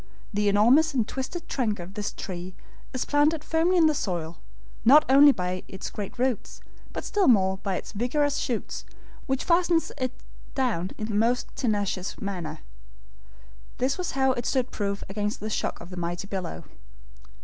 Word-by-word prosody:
The 205 Hz, 0 st, +2 dB
enormous 260 Hz, +10 st, +5 dB
and 230 Hz, -4 st, +2 dB
twisted 335 Hz, +6 st, -5 dB
trunk 225 Hz, -9 st, 0 dB
of 175 Hz, +2 st, -8 dB
this 205 Hz, 0 st, -3 dB
tree 180 Hz, 0 st, -6 dB, 0.4 s
is 255 Hz, -, -2 dB
planted 295 Hz, +1 st, +2 dB
firmly 330 Hz, +4 st, +2 dB
in 335 Hz, -, +6 dB
the 310 Hz, -, +4 dB
soil, 170 Hz, -, -3 dB, 0.4 s
not 295 Hz, +6 st, +7 dB
only 280 Hz, +2 st, +8 dB
by 180 Hz, -5 st, -2 dB
its 190 Hz, -, -6 dB
great 205 Hz, +2 st, -6 dB
roots, 250 Hz, -3 st, -1 dB, 0.3 s
but -, -, -5 dB
still 410 Hz, -5 st, +1 dB
more 190 Hz, -5 st, +4 dB
by 195 Hz, -2 st, -2 dB
its -, -, -5 dB
vigorous 275 Hz, +7 st, 0 dB
shoots, 235 Hz, -4 st, -3 dB, 0.4 s
which 265 Hz, -1 st, 0 dB
fasten 345 Hz, -1 st, +4 dB, 0.2 s
it 255 Hz, -1 st, -1 dB, 0.4 s
down 230 Hz, -10 st, 0 dB
in 215 Hz, -, -3 dB
the 215 Hz, -, -4 dB
most 230 Hz, +4 st, +1 dB
tenacious 205 Hz, -6 st, -1 dB
manner. 175 Hz, -6 st, -4 dB, 1.2 s
This 265 Hz, +6 st, 0 dB
was 360 Hz, -, -2 dB
how 265 Hz, 0 st, +4 dB
it 245 Hz, -2 st, -2 dB
stood 260 Hz, -2 st, 0 dB
proof 200 Hz, -1 st, -2 dB
against 205 Hz, +1 st, -2 dB
the 215 Hz, +1 st, -4 dB
shock -, -, -2 dB
of 170 Hz, +2 st, -11 dB
the 180 Hz, -, -7 dB
mighty 175 Hz, +2 st, -3 dB
billow. 190 Hz, -4 st, -5 dB
225 Hz, 170 wpm, -26 LUFS, 195-275 Hz, 1.2 s, only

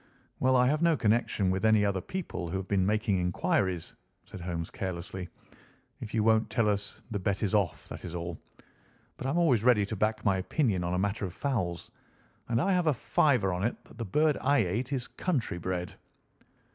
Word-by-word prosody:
"Well, 130 Hz, 0 st, +3 dB
I 125 Hz, 0 st, +5 dB
have 150 Hz, +4 st, +2 dB
no 170 Hz, -2 st, +4 dB
connection 110 Hz, -4 st, +1 dB
with 95 Hz, +2 st, -1 dB
any 110 Hz, -2 st, +5 dB
other 100 Hz, -2 st, 0 dB
people 95 Hz, -, -5 dB
who 95 Hz, -, -2 dB
have 95 Hz, 0 st, -5 dB
been 95 Hz, -1 st, +2 dB
making 105 Hz, -2 st, +1 dB
inquiries," 95 Hz, -, 0 dB, 0.3 s
said 95 Hz, -, -10 dB
Holmes 85 Hz, -1 st, -4 dB
carelessly. 90 Hz, 0 st, -5 dB, 0.7 s
"If 105 Hz, -, -7 dB
you 110 Hz, -, +2 dB
won't 110 Hz, 0 st, +3 dB
tell 110 Hz, 0 st, +1 dB
us 100 Hz, -1 st, -1 dB
the 105 Hz, -, -1 dB
bet 100 Hz, +2 st, -1 dB
is 105 Hz, -, 0 dB
off, 100 Hz, -6 st, 0 dB
that -, -, -8 dB
is 90 Hz, -1 st, -6 dB
all. 85 Hz, -1 st, -5 dB, 0.8 s
But 130 Hz, -, -4 dB
I'm 140 Hz, -, 0 dB
always 135 Hz, -11 st, +3 dB
ready 120 Hz, -5 st, +5 dB
to 110 Hz, -, -4 dB
back 110 Hz, +2 st, -1 dB
my 100 Hz, -2 st, +3 dB
opinion 100 Hz, -, 0 dB
on 90 Hz, +1 st, -1 dB
a -, -, 0 dB
matter 100 Hz, +2 st, -1 dB
of 90 Hz, -, -7 dB
fowls, 95 Hz, -12 st, -2 dB, 0.6 s
and 115 Hz, -1 st, +2 dB
I 195 Hz, +7 st, +2 dB
have 180 Hz, -2 st, +1 dB
a 155 Hz, -, +5 dB
fiver 115 Hz, -5 st, +2 dB
on 90 Hz, +2 st, -2 dB
it 115 Hz, -, 0 dB
that -, -, -17 dB
the -, -, -1 dB
bird 150 Hz, +8 st, +2 dB
I 140 Hz, +2 st, +3 dB
ate 120 Hz, +9 st, -2 dB
is 130 Hz, -3 st, -2 dB
country 130 Hz, -, -2 dB
bred." 90 Hz, 0 st, -3 dB
105 Hz, 205 wpm, -29 LUFS, 95-125 Hz, 0.8 s, I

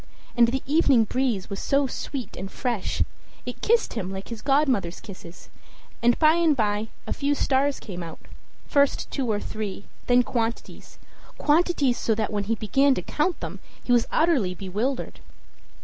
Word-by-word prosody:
And 235 Hz, -1 st, +6 dB
the 260 Hz, +3 st, -2 dB
evening 280 Hz, -5 st, +4 dB
breeze 240 Hz, -3 st, -1 dB
was 200 Hz, -, -5 dB
so 280 Hz, 0 st, +2 dB
sweet 265 Hz, 0 st, -5 dB
and 190 Hz, +1 st, -6 dB
fresh 240 Hz, -7 st, -1 dB, 0.4 s
it -, -, -6 dB
kissed 460 Hz, +1 st, +2 dB
him 190 Hz, -5 st, -3 dB
like 190 Hz, 0 st, -7 dB
his 230 Hz, -2 st, -6 dB
godmother's 270 Hz, -, +1 dB
kisses; 185 Hz, -3 st, -12 dB, 0.5 s
and 240 Hz, 0 st, +4 dB
by 310 Hz, 0 st, +5 dB
and 325 Hz, -4 st, +3 dB
by 210 Hz, -1 st, 0 dB, 0.2 s
a -, -, -2 dB
few 285 Hz, +1 st, 0 dB
stars 275 Hz, 0 st, +1 dB
came 180 Hz, -3 st, -7 dB
out 165 Hz, -2 st, -7 dB, 0.5 s
first 280 Hz, -1 st, +1 dB
two 255 Hz, -5 st, -1 dB
or 205 Hz, -, 0 dB
three, 210 Hz, -3 st, -4 dB
and 200 Hz, -, -18 dB
then 245 Hz, 0 st, +5 dB
quantities 230 Hz, -1 st, -4 dB, 0.4 s
quantities! 300 Hz, -5 st, +2 dB
so 220 Hz, -, +1 dB
that 215 Hz, 0 st, -2 dB
when 205 Hz, -1 st, -1 dB
he 225 Hz, +3 st, 0 dB
began 270 Hz, +6 st, +3 dB
to 180 Hz, -, -3 dB
count 315 Hz, -, -1 dB
them -, -, -6 dB, 0.2 s
he -, -, -2 dB
was 240 Hz, -1 st, +4 dB
utterly 275 Hz, -, +2 dB
bewildered. 210 Hz, +9 st, -3 dB
240 Hz, 170 wpm, -25 LUFS, 205-280 Hz, 0.5 s, And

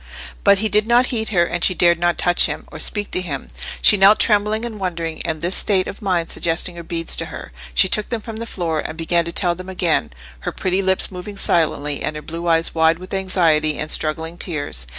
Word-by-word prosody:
But 200 Hz, -1 st, +5 dB
he 220 Hz, +2 st, 0 dB
did 210 Hz, 0 st, +2 dB
not 240 Hz, +2 st, +4 dB
heed 220 Hz, -2 st, -1 dB
her, 175 Hz, -5 st, +2 dB
and 175 Hz, +1 st, -3 dB
she 185 Hz, -, +4 dB
dared 170 Hz, -1 st, +3 dB
not 175 Hz, 0 st, +1 dB
touch 175 Hz, 0 st, +3 dB
him, -, -, -5 dB
or -, -, -9 dB
speak 205 Hz, -1 st, -2 dB
to 185 Hz, -, 0 dB
him: 145 Hz, -7 st, -5 dB, 0.3 s
she 210 Hz, -, +7 dB
knelt, 200 Hz, +2 st, +6 dB
trembling 215 Hz, +1 st, +2 dB
and 220 Hz, -3 st, -7 dB
wondering; 170 Hz, -3 st, -4 dB
and 160 Hz, -1 st, -4 dB
this 175 Hz, +2 st, 0 dB
state 190 Hz, -2 st, +2 dB
of -, -, -8 dB
mind 180 Hz, -5 st, -1 dB
suggesting 170 Hz, +1 st, 0 dB
her 170 Hz, -, -7 dB
beads 165 Hz, 0 st, -1 dB
to -, -, -1 dB
her, -, -, -9 dB, 0.2 s
she -, -, +5 dB
took 215 Hz, -, +1 dB
them 235 Hz, -, -2 dB
from 220 Hz, 0 st, -8 dB
the 230 Hz, +1 st, -6 dB
floor, 165 Hz, -6 st, -2 dB
and 155 Hz, +1 st, -5 dB
began 170 Hz, +1 st, 0 dB
to 170 Hz, -, -4 dB
tell 175 Hz, 0 st, +1 dB
them 185 Hz, +2 st, -9 dB
again, 170 Hz, -, 0 dB, 0.3 s
her -, -, -4 dB
pretty 185 Hz, +1 st, -1 dB
lips 190 Hz, 0 st, +1 dB
moving 190 Hz, +2 st, -8 dB
silently, 150 Hz, -5 st, 0 dB
and 155 Hz, -, -3 dB
her 150 Hz, -, -7 dB
blue 170 Hz, +2 st, -6 dB
eyes 165 Hz, 0 st, +1 dB
wide 160 Hz, 0 st, +3 dB
with 185 Hz, +2 st, -10 dB
anxiety 165 Hz, -5 st, +1 dB
and 155 Hz, -, -3 dB
struggling 160 Hz, +2 st, -1 dB
tears. 145 Hz, -, -4 dB
175 Hz, 230 wpm, -20 LUFS, 165-195 Hz, 0.3 s, she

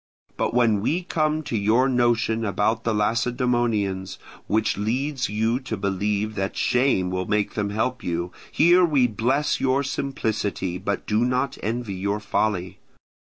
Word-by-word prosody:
But -, -, -1 dB
when 115 Hz, -4 st, +3 dB
we 170 Hz, -, 0 dB
come 155 Hz, -3 st, 0 dB
to 125 Hz, -, -4 dB
your 110 Hz, +5 st, +3 dB
notion 120 Hz, -3 st, +1 dB
about 110 Hz, +2 st, 0 dB
the 115 Hz, -, +2 dB
Lacedaemonians, 115 Hz, -3 st, 0 dB, 0.3 s
which 110 Hz, +1 st, +1 dB
leads 130 Hz, +6 st, -1 dB
you 110 Hz, +4 st, 0 dB
to 125 Hz, -5 st, -5 dB
believe 100 Hz, +2 st, -1 dB
that 95 Hz, -1 st, -3 dB
shame 120 Hz, -8 st, +2 dB
will 95 Hz, 0 st, -2 dB
make 105 Hz, -1 st, 0 dB
them 105 Hz, -2 st, -1 dB
help 120 Hz, +5 st, -2 dB
you, 85 Hz, +1 st, -2 dB, 0.2 s
here 175 Hz, +3 st, +5 dB
we 145 Hz, -7 st, +3 dB
bless 125 Hz, +6 st, 0 dB
your 135 Hz, +1 st, +2 dB
simplicity 110 Hz, -9 st, -2 dB
but 100 Hz, +1 st, -3 dB
do 105 Hz, 0 st, +1 dB
not 125 Hz, +2 st, -1 dB
envy 115 Hz, -1 st, -3 dB
your 100 Hz, +2 st, -2 dB
folly. 95 Hz, -3 st, -1 dB
110 Hz, 150 wpm, -24 LUFS, 100-125 Hz, 0.3 s, here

